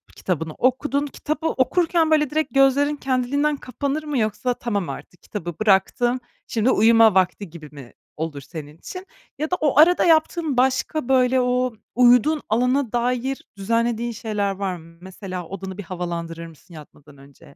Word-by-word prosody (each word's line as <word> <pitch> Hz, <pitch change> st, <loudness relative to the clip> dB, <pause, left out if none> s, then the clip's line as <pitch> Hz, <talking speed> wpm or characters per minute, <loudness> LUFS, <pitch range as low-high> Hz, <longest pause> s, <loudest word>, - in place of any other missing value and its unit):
kitabını 160 Hz, -4 st, -3 dB
okudun, 280 Hz, -, 0 dB
kitabı 305 Hz, +3 st, -3 dB
okurken, 325 Hz, +3 st, +1 dB
böyle, 300 Hz, -2 st, +3 dB
direkt 310 Hz, 0 st, -1 dB
gözlerin 275 Hz, +2 st, +3 dB
kendiliğinden 280 Hz, +3 st, 0 dB
kapanır 280 Hz, +5 st, -3 dB
mı 295 Hz, -2 st, -3 dB
yoksa, 225 Hz, +2 st, 0 dB
"Tamam, 205 Hz, -9 st, -3 dB
artık 155 Hz, +5 st, -9 dB
kitabı 175 Hz, -5 st, -6 dB
bıraktım, 215 Hz, +5 st, +2 dB, 0.3 s
şimdi 230 Hz, +3 st, +1 dB
uyuma 225 Hz, -1 st, +5 dB
vakti." 185 Hz, 0 st, +1 dB
gibi 155 Hz, -3 st, -11 dB
mi 135 Hz, -5 st, -12 dB, 0.2 s
olur 155 Hz, -2 st, -4 dB
senin 150 Hz, +1 st, -10 dB
için? 365 Hz, -, -9 dB, 0.3 s
Ya 310 Hz, +3 st, -2 dB
da 360 Hz, -, +3 dB
o 295 Hz, -2 st, +2 dB
arada 350 Hz, +3 st, +6 dB
yaptığın 320 Hz, -3 st, +2 dB
başka, 265 Hz, +2 st, 0 dB
böyle, 255 Hz, 0 st, +3 dB
o 250 Hz, 0 st, 0 dB, 0.2 s
uyuduğun 250 Hz, +5 st, +4 dB
alana 250 Hz, +2 st, +1 dB
dair 250 Hz, +2 st, -1 dB
düzenlediğin 230 Hz, +3 st, 0 dB
şeyler 210 Hz, -3 st, -2 dB
var 195 Hz, -1 st, -3 dB
mı? 165 Hz, 0 st, -15 dB
Mesela, 185 Hz, -1 st, -7 dB
odanı 190 Hz, -1 st, -7 dB
bir 205 Hz, -, -6 dB
havalandırır 170 Hz, -2 st, -5 dB
mısın 165 Hz, +2 st, -17 dB
yatmadan 145 Hz, -2 st, -14 dB
önce? 140 Hz, 0 st, -18 dB
240 Hz, 155 wpm, -22 LUFS, 185-275 Hz, 0.3 s, arada